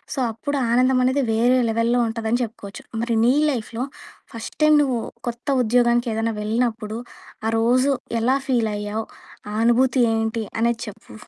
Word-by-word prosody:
So 275 - -3
అప్పుడు 285 +6 -3
ఆనందం 255 +2 +3
అనేది 260 +2 +2
వేరే 240 +3 +3
లెవెల్‌లో 230 +2 +1
ఉంటదని 225 +1 -1
చెప్పుకోవచ్చు. 205 -3 -8 0.2
మరి 235 -1 0
నీ 245 +2 +5 0.2
లైఫ్‌లో 235 0 -4 0.5
ఫస్ట్ 230 -1 -8
టైం 305 0 +6
నువ్వు 260 -4 0 0.3
కొత్త 240 0 -5 0.2
ఉద్యోగానికేదైనా 235 -1 +1
వెళ్ళినప్పుడు 220 0 -1 0.5
ఆ - - +2
రోజు 255 +4 +3 0.3
ఎలా 255 +4 +3
ఫీల్ 235 -4 +1
అయ్యావు? 210 +2 -3 0.5
ఆ - - -5
అనుభూతి 250 +2 +3
ఏంటి? 225 0 -1 0.2
అనేది 235 0 +1
చెప్పు. 200 - -11
235 Hz, 145 wpm, -22 LUFS, 225-250 Hz, 0.5 s, టైం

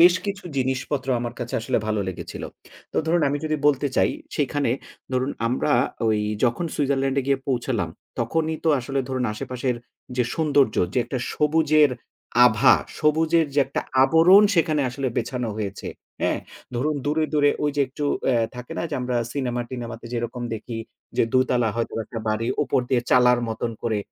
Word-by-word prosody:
বেশ 175 +1 +8
কিছু 200 0 -4
জিনিসপত্র 130 +1 -1
আমার 120 0 -4
কাছে 120 -1 -4
আসলে 115 - 0
ভালো 110 -1 0
লেগেছিল। 95 - -6 0.5
তো - - -6
ধরুন 170 0 +2
আমি 145 - -1
যদি 155 0 0
বলতে 145 -1 +3
চাই, - - +4 0.3
সেখানে 145 -3 0 0.4
ধরুন 130 +2 0 0.2
আমরা 130 +5 +1 0.4
ওই 110 -1 +2 0.2
যখন 120 +8 +1
সুইজারল্যান্ডে 135 -1 +1
গিয়ে 140 -1 +2
পৌঁছালাম। 120 -7 0 0.3
তখনই 160 +7 0
তো - - +3
আসলে 135 +3 -3
ধরুন 130 -1 -1
আশেপাশের 125 +3 -3 0.4
যে 125 - +3
সৌন্দর্য 145 -7 +3 0.2
যে - - +1
একটা 125 +2 -3 0.2
সবুজের 150 -1 +4 0.5
আভা, 125 +2 +6 0.2
সবুজের 160 +1 +3
যে - - +2
একটা 135 - -2 0.2
আবরণ 165 +8 +7
সেখানে 160 -3 +2
আসলে 130 +2 -3
বেছানো 120 0 -2
হয়েছে। 100 -2 -4 0.3
হ্যাঁ? - - +1 0.3
ধরুন 145 +5 0
দূরে, 155 +2 +1
দূরে, 145 -1 +4
ওই 145 - +2
যে - - +2
একটু 145 +3 -5 0.2
অ্যা 125 -3 +3 0.2
থাকে 125 0 -8
না - - -1
যে - - -2
আমরা 125 0 -1 0.2
সিনেমা-টিনেমাতে 120 -3 -4
যেরকম 120 +1 -3
দেখি। 115 +1 -6 0.4
যে - - +4
২ 130 0 +4
তালা 120 -2 +2
হয়তো 115 - -2
একটা 115 - -6
বাড়ি 110 +2 0 0.2
উপর 130 - +1
দিয়ে 130 -2 +2
চালার 125 -1 +5
মতন 115 +1 -2
করে 110 -3 0
130 Hz, 165 wpm, -24 LUFS, 120-150 Hz, 0.5 s, বেশ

